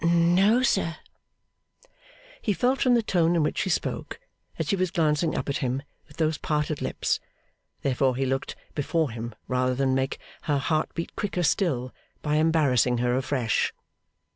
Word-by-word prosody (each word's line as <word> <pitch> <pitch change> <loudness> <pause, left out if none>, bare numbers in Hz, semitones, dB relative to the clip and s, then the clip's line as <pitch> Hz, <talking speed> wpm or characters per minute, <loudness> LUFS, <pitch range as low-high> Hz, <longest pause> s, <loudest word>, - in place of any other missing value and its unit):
'No, 175 +8 +4
sir.' 190 -9 +1 1.5
He 210 - +1
felt, 255 +6 +1
from 250 -2 +5
the 235 - +2
tone 175 -4 +2
in 165 - +3
which 150 - -1
she - - 0
spoke, 170 - -2 0.4
that - - -1
she 200 - +1
was 185 -1 0
glancing 160 -1 +1
up - - -2
at 140 0 0
him 130 +1 -2 0.2
with 150 - -18
those 160 -1 +1
parted 150 -1 -1
lips; - - -1 0.6
therefore 130 -1 +2
he 135 +1 0
looked 135 +1 -2 0.2
before 155 -1 0
him, 115 -1 -6
rather 125 0 +1
than 135 0 +1
make 130 +1 0 0.3
her 145 - +3
heart 155 +3 0
beat 165 - -4
quicker 190 -4 -1
still 150 - +1 0.3
by 150 0 +1
embarrassing 145 -7 +3
her 125 +1 +1
afresh. 130 -3 0
150 Hz, 165 wpm, -26 LUFS, 130-170 Hz, 1.5 s, from